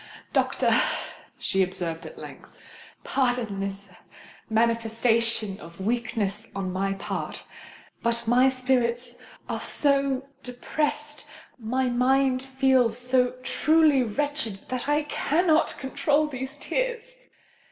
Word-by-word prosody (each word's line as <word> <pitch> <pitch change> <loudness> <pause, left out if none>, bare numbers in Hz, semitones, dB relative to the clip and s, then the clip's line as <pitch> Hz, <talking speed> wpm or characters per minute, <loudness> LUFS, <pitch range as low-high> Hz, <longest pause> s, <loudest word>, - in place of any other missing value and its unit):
"Doctor," - - +2 0.6
she 190 - 0
observed 180 -3 -2
at - - -12
length, - - -12 0.4
"pardon 245 -6 0
this 195 0 -4 0.6
manifestation 230 -2 +1
of 170 +1 -12
weakness 220 -1 -2
on 190 -2 -3
my 195 +1 0
part; 195 - -5 0.6
but 235 0 0
my 250 +3 +5
spirits 250 -2 0 0.3
are - - -3
so 275 -2 +1
depressed—my 265 -2 -3
mind 255 +1 +3
feels 265 -3 +2
so 250 0 +1
truly 305 +1 +4
wretched, 250 -3 -2
that 255 +2 -3
I 295 +1 +3
cannot 315 +2 +2
control 290 +2 +1
these 265 0 -6
tears. - - -3
250 Hz, 100 wpm, -26 LUFS, 225-275 Hz, 0.6 s, my